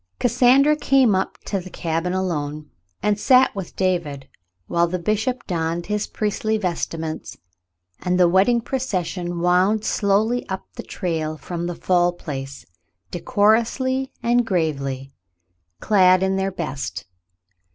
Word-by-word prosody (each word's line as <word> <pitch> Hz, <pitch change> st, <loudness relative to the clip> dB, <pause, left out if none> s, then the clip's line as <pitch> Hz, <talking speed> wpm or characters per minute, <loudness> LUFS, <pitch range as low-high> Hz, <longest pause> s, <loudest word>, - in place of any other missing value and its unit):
Cassandra 255 Hz, +5 st, +4 dB
came 270 Hz, -6 st, +3 dB
up 190 Hz, -, -1 dB
to 200 Hz, -, -2 dB
the 185 Hz, 0 st, -9 dB
cabin 165 Hz, 0 st, -2 dB
alone 155 Hz, -5 st, -3 dB, 0.3 s
and 210 Hz, 0 st, +1 dB
sat 255 Hz, +2 st, +4 dB
with 195 Hz, -3 st, -6 dB
David, 170 Hz, -8 st, -1 dB, 0.4 s
while 170 Hz, -, +1 dB
the 180 Hz, +2 st, -2 dB
bishop 220 Hz, +7 st, -1 dB
donned 170 Hz, -1 st, -2 dB
his 210 Hz, 0 st, -2 dB
priestly 215 Hz, +1 st, -1 dB
vestments, 165 Hz, -4 st, -4 dB, 0.6 s
and 180 Hz, 0 st, 0 dB
the 180 Hz, -, +6 dB
wedding 195 Hz, +7 st, +3 dB
procession 185 Hz, -9 st, -3 dB
wound 185 Hz, +5 st, +2 dB
slowly 215 Hz, +5 st, +1 dB
up 190 Hz, 0 st, -4 dB
the -, -, -6 dB
trail 160 Hz, -4 st, -3 dB
from 175 Hz, +1 st, -5 dB
the 175 Hz, -, -4 dB
Fall 175 Hz, -1 st, +2 dB
Place, 140 Hz, -5 st, -7 dB, 0.5 s
decorously 235 Hz, +8 st, +1 dB
and 240 Hz, +1 st, +3 dB
gravely, 140 Hz, -, -2 dB, 0.7 s
clad 185 Hz, -3 st, +4 dB
in 190 Hz, 0 st, +1 dB
their 195 Hz, 0 st, -1 dB
best. 150 Hz, -, -5 dB
185 Hz, 130 wpm, -22 LUFS, 170-215 Hz, 0.7 s, the